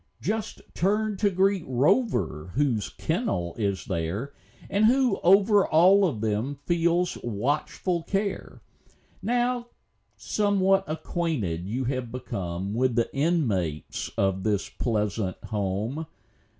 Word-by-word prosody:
Just 215 +2 -3
turn 210 +3 +1
to 205 +1 +3
greet 195 -1 +2
Rover, 120 - +1
whose 125 -7 +1
kennel 85 -1 -2
is 100 -3 -1
there 95 +10 -3 0.3
And 205 +2 +2
who 250 -2 +3
over 200 +3 +5
all 185 +5 +5
of 120 -11 -4
them 110 +6 -1
feels 175 +1 +1
watchful 145 - -1
care. 195 +3 -3 0.6
Now 245 0 0 0.5
somewhat 195 -2 +2
acquainted 155 - -2
you 125 +6 -2
have 130 -2 -2
become 100 -6 -4
With 125 +1 +1
the 115 +2 0
inmates 115 - 0
of 95 -1 +1
this 105 -1 0
pleasant 105 -4 -1
home. 110 +9 -2
140 Hz, 110 wpm, -26 LUFS, -, 0.6 s, over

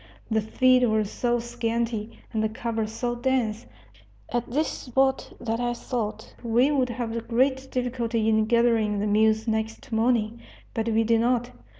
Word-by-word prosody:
The 220 0 +3
feed 255 +4 +3
was 215 -3 +1
so 240 -1 0
scanty, 230 -1 -2 0.2
and 220 - 0
the 220 - +1
cover 225 0 -2
so 240 +2 -3
dense, 240 - -1 0.6
at 240 0 -2
this 300 +6 +1
spot 265 +1 0
that 230 -1 -2
I 240 0 -1
thought 220 -3 -4
we 245 +4 +3
would 260 -4 +1
have 230 -1 -4
great 265 +3 +1
difficulty 240 -3 -1
in 220 -1 +3
gathering 230 -2 +2
the 205 - -1
mules 220 +1 +3
next 220 +1 -2
morning. 225 0 +1 0.3
But 225 0 -1
we 225 0 +3
did 225 0 +3
not. 245 0 +1
230 Hz, 160 wpm, -26 LUFS, 220-245 Hz, 0.6 s, The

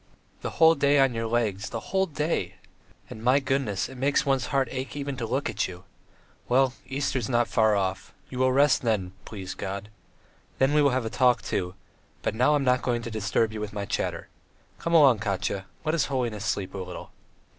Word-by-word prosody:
The - - -3
whole 160 0 +7
day 145 -1 +3
on 135 -2 +4
your 115 0 -2
legs, 110 -4 -1
the 115 - -7
whole 190 0 +3
day.... 150 - -2 0.5
And, 110 - -10
my 130 +4 +4
goodness, 135 -7 -1
it 130 -1 -11
makes 140 +2 +2
one's 135 -3 +1
heart 135 -2 +1
ache 130 +2 -5
even 140 -1 -3
to 115 -2 -3
look 135 +5 -1
at - - -1
you! 90 0 -10 0.7
Well, 130 0 +3
Easter 135 0 -1
is 115 - -4
not 120 -1 +2
far 110 -1 +3
off; 95 -1 -2 0.2
you 125 - -7
will 130 0 +3
rest 140 +1 +4
then, 105 -6 0
please 95 -4 -6
God. 100 +2 -5 0.7
Then 135 +2 +3
we 150 - +5
will 145 - +5
have 130 -2 -1
a 110 - -3
talk, 125 -2 +3
too, 90 -3 -2 0.5
but - - 0
now 125 +7 +3
I'm 145 - +1
not 125 -1 +3
going 120 -2 -1
to 115 - -5
disturb 110 +1 0
you 110 - -5
with 105 -1 -5
my 100 -1 -3
chatter. - - -3 0.5
Come 170 0 0
along, 135 -8 +6
Katya; 100 -2 -2 0.2
let 155 - +1
his 165 - +2
holiness 120 -7 -2
sleep 100 -2 -2
a 100 - -5
little." 90 -1 -7
120 Hz, 210 wpm, -26 LUFS, 105-135 Hz, 0.7 s, whole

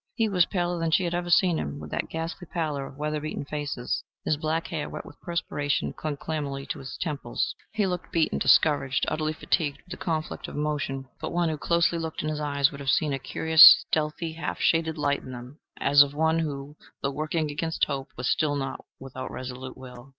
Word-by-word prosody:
He 225 - +2
was 180 -4 +3
paler 175 -2 -1
than 165 0 0
she 175 +4 +3
had 170 -1 -1
ever 175 0 -2
seen 175 -1 +4
him, 70 0 -4
with 75 0 -9
that - - -2
ghastly 165 +2 -5
pallor 150 -5 -2
of 135 - -13
weather 150 +1 -2
beaten 155 -1 -4
faces. 145 -4 -3 0.2
His 155 - +2
black 155 +2 -1
hair, 155 -3 -3
wet - - -7
with 145 - -14
perspiration, 145 -4 -1
clung 150 -2 -4
clammily 140 -3 -4
to - - -3
his 135 - -7
temples. 150 +1 -2 0.2
He 210 -2 +1
looked 180 -1 -3
beaten, 165 -2 +1
discouraged, 140 -3 +4
utterly 155 0 -1
fatigued 150 -2 0
with 180 - -18
the 185 - -5
conflict 160 -2 -3
of - - -8
emotion. 145 -3 -2
But - - -4
one 170 -1 +2
who - - -1
looked 150 - -7
closely 170 0 +3 0.2
in 155 - -2
his 155 -1 -2
eyes 140 0 +2
would 140 - -9
have 140 -1 -3
seen 150 +1 +2
a 135 - -2
curious 160 +5 +8
stealthy, 160 +1 -1
half 165 - -4
shaded 160 -1 +2
light 145 -1 +1
in 130 - -9
them, 125 +4 -10 0.2
as 145 +1 +6
of 145 0 +3
one 160 +1 +2
who, 145 -1 -4 0.3
though 140 - +1
working 155 +2 -1
against 160 +2 0
hope, 135 -2 -4
was 125 +1 -2
still 150 -2 +2
not 135 -1 -4 0.2
without 130 -1 -7
resolute 130 0 -7
will. 125 0 -11
150 Hz, 215 wpm, -27 LUFS, 140-165 Hz, 0.3 s, curious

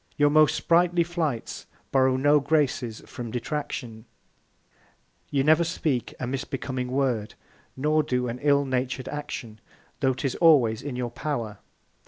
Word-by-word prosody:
Your 145 -1 +4
most 155 -1 +5
sprightly 175 0 +3
Flights 165 -8 -3 0.2
borrow 130 -1 +3
no 145 +2 +4
Graces 140 -6 0
from 120 -2 -7
Detraction; 120 -2 -4 1.2
you 140 -2 +1
never 155 +3 +5
speak 150 -6 -2
a - - -2
misbecoming 130 0 -3
Word, 125 -5 -1 0.4
nor 155 +3 +2
do 125 -4 -1
an 120 +1 -4
ill 140 -1 +3
natur'd 130 0 -2
Action, 125 -7 -6 0.4
tho' 130 -1 +2
'tis 130 +1 -2
always 130 -10 +5
in 140 -3 -5
your 125 -1 -3
Power. 120 -6 -4
135 Hz, 135 wpm, -26 LUFS, 125-150 Hz, 1.2 s, most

